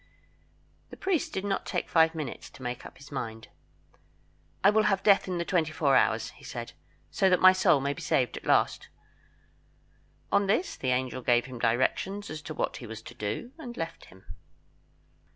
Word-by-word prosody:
The - - -11
priest 375 -5 0
did 190 - -3
not 195 -1 -1
take 180 - -3
five 160 0 +4
minutes 150 -6 -6
to 130 - -14
make 125 0 -5
up - - -17
his 145 - -14
mind. 115 -5 -5 1.1
"I 200 - +7
will 215 0 +3
have 195 -1 0
death 200 -2 +5
in 180 -1 -2
the 170 - -2
twenty 165 -4 +1
four 145 -3 +2
hours," - - +2
he - - -19
said, - - -6 0.4
"so 190 - +3
that 180 - +4
my 185 0 +8
soul 185 -6 +4
may 140 +1 -1
be 165 - -10
saved 135 -4 +1
at - - -8
last." - - +2 1.4
On 200 -1 +3
this 225 - +1
the 130 - -3
angel 130 0 -1
gave 120 0 +3
him 130 -2 -8
directions 130 - 0
as 155 0 -6
to 155 0 -7
what - - -2
he 120 - -9
was 110 0 -8
to - - -10
do, 120 - -4
and 245 -6 -8
left 165 0 -5
him. 95 +1 -18
155 Hz, 190 wpm, -28 LUFS, 125-195 Hz, 1.4 s, my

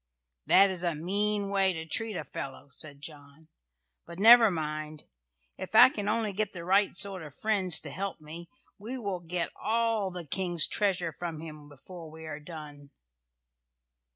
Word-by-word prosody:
"That 195 +1 +7
is 180 -2 -3
a 170 -3 0
mean 200 +5 -1
way 195 -1 +3
to 160 -1 -6
treat 220 +6 -3
a 155 - -3
fellow," 135 0 -8
said 145 +1 -6
John. 145 +1 -12 0.6
"But 170 0 -10
never 225 +2 +8
mind! 155 -2 -4 0.6
If 190 +3 -7
I 245 +3 +10
can 205 -7 -5
only 215 -2 0
get 210 0 -2
the 170 -2 -7
right 195 +1 +2
sort 195 -1 -1
of 150 -3 -11
friends 195 -5 +1
to 150 - -8
help 195 +5 -5
me 160 +3 -10 0.3
we 235 +6 -5
will 200 -6 -3
get 175 0 -3
all 225 -3 0
the 180 -2 -8
King's 175 -2 0
treasure 185 -5 0
from 165 -1 -6
him 155 -2 -10
before 160 +4 -11
we 160 +1 -11
are 155 -1 -6
done." 150 -3 -11
175 Hz, 170 wpm, -29 LUFS, 155-200 Hz, 0.6 s, I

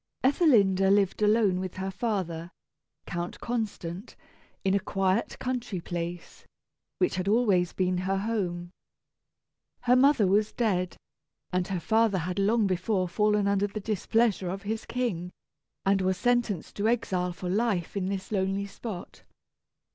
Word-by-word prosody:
Ethelinda 215 - +4
lived 200 0 +2
alone 210 -3 +3
with 185 -1 -5
her 190 +1 -3
father, 185 -7 -2 0.6
Count 175 0 -4
Constant, 210 -5 -4 0.5
in 190 -1 +2
a 200 - +3
quiet 195 +3 0
country 245 -7 -3
place, 170 0 -6 0.5
which 365 - +1
had 185 +1 -2
always 200 -5 +3
been 185 -1 0
her 190 +1 0
home. 185 -5 -2 1.1
Her 250 0 +4
mother 265 -4 +5
was 205 +3 +2
dead, 185 -6 0 0.6
and 180 0 +1
her 190 -2 -2
father 220 +1 +2
had 180 +2 -2
long 215 +2 +3
before 185 0 0
fallen 210 +3 +2
under 200 0 +2
the 210 +1 -5
displeasure 215 -1 +1
of 195 +3 -5
his 220 +2 -4
king, 210 -9 -2 0.6
and 195 0 +3
was 185 0 +1
sentenced 240 -7 0
to 205 +1 +1
exile 185 -6 0
for 180 +1 -6
life 200 -2 0
in 190 -2 -1
this 195 0 -4
lonely 195 0 0
spot. 200 -2 -8
195 Hz, 140 wpm, -28 LUFS, 185-220 Hz, 1.1 s, mother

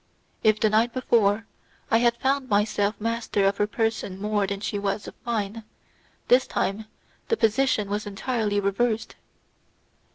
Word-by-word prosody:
If, 215 -1 +4
the 215 - +2
night 225 +2 +2
before, 225 -4 +2 0.5
I 225 - +5
had 235 0 +2
found 270 0 0
myself 205 0 +1
master 225 -2 0
of 195 +1 +2
her 205 - +1
person 220 -4 -2
more 205 -1 0
than 200 0 -3
she 205 0 -3
was 200 +1 -2
of - - -8
mine, 225 -1 -3 0.6
this 255 +1 +4
time 205 +3 -2 0.4
the 455 - +1
position 225 - +2
was 205 +1 -3
entirely 210 0 -1
reversed. 220 +3 -1
215 Hz, 150 wpm, -25 LUFS, 205-235 Hz, 0.6 s, I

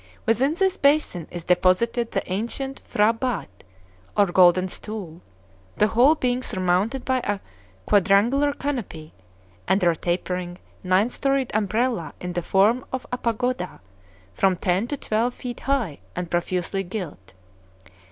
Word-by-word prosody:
Within 260 +7 +2
this 385 +1 +1
basin 280 - +2
is 175 -1 -5
deposited 185 +7 +2
the - - -1
ancient 235 +8 -3
P'hra 210 +2 +4
batt, 205 - -4 0.5
or 205 - +6
golden 185 0 +4
stool, 185 -4 -6 0.6
the 210 - +3
whole 255 +8 +5
being 250 -3 0
surmounted 195 +4 0
by 260 -1 +1
a 205 -4 -1 0.5
quadrangular 210 +9 +3
canopy, 230 - -5 0.5
under 185 -3 +3
a - - -3
tapering, 175 +1 -3 0.3
nine 190 +6 +2
storied 275 -1 0
umbrella 215 -2 0
in 180 0 -5
the 175 - -1
form 205 +8 +3
of 260 -1 -4
a 250 - -1
pagoda, 235 -4 -2 0.5
from 190 -1 +2
ten 185 +6 0
to 290 - -3
twelve 235 +1 -1
feet 245 -1 -6
high 250 - -1 0.2
and 175 -1 -4
profusely 180 +2 -1
gilt. 175 - -7
210 Hz, 135 wpm, -24 LUFS, 180-250 Hz, 0.6 s, or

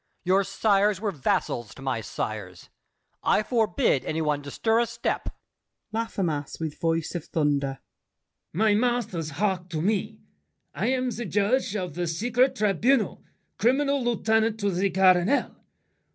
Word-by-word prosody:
Your 190 +2 +3
sires 200 0 +2
were 210 -1 -1
vassals 120 - -1
to 135 - -11
my 130 -4 -1
sires. 105 - -5 0.5
I 215 - +2
forbid 215 - +1
any 160 - -2
one 150 -2 0
to 140 - -8
stir 225 +8 +1
a 235 - +2
step. - - -2 0.6
LAFFEMAS 185 -10 -2
(with 160 -2 -4
voice 165 -1 0
of 175 -3 -4
thunder). 140 -3 0 0.7
My 215 +4 +3
masters, 220 -8 0
hark 185 +2 -1
to 160 -3 -3
me: 195 - -1 0.6
I 190 +10 -1
am 255 -1 0
the 240 +1 -5
judge 210 +3 +1
Of 180 -6 -3
the 175 +2 -2
secret 245 +10 +1
tribunal, 215 +2 +1 0.4
Criminal 275 +4 +2
Lieutenant 220 -2 +1
to 200 0 +1
the 190 +2 +1
Cardinal. 185 +6 +3
195 Hz, 140 wpm, -26 LUFS, 165-225 Hz, 0.7 s, Your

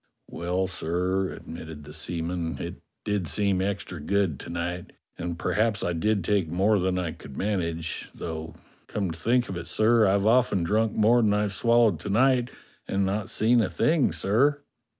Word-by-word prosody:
"Well, 90 +2 -1
sir," 95 +1 -1
admitted 80 -2 -9
the 75 +1 -11
seaman, 85 +1 -3
"it - - -6 0.2
did 100 -4 -1
seem 100 +1 +1
extra 95 -3 -3
good 95 -2 0
to - - -9
night, 90 +1 -4 0.2
and 85 0 -4
perhaps 105 +2 0
I 85 - 0
did 100 +4 0
take 100 -2 +1
more 95 +6 +2
than 90 0 0
I 90 -3 -1
could 75 -4 -11
manage; 85 -5 -2
though 80 -1 -6 0.3
come 100 -4 -2
to 80 - -9
think 120 +7 +2
of 95 - -5
it, 85 - -6
sir, 110 0 +4
I've 100 +1 +2
often 115 -5 +3
drunk 110 +5 +1
more 115 +3 +4
than 105 -2 +3
I've 105 -1 0
swallowed 115 0 +3
to - - -6
night 125 +3 +3 0.4
and 100 0 0
not 100 +1 -2
seen 115 +2 +3
a 100 - 0
thing, 140 - +2
sir." 120 - +2
95 Hz, 175 wpm, -26 LUFS, 85-110 Hz, 0.4 s, sir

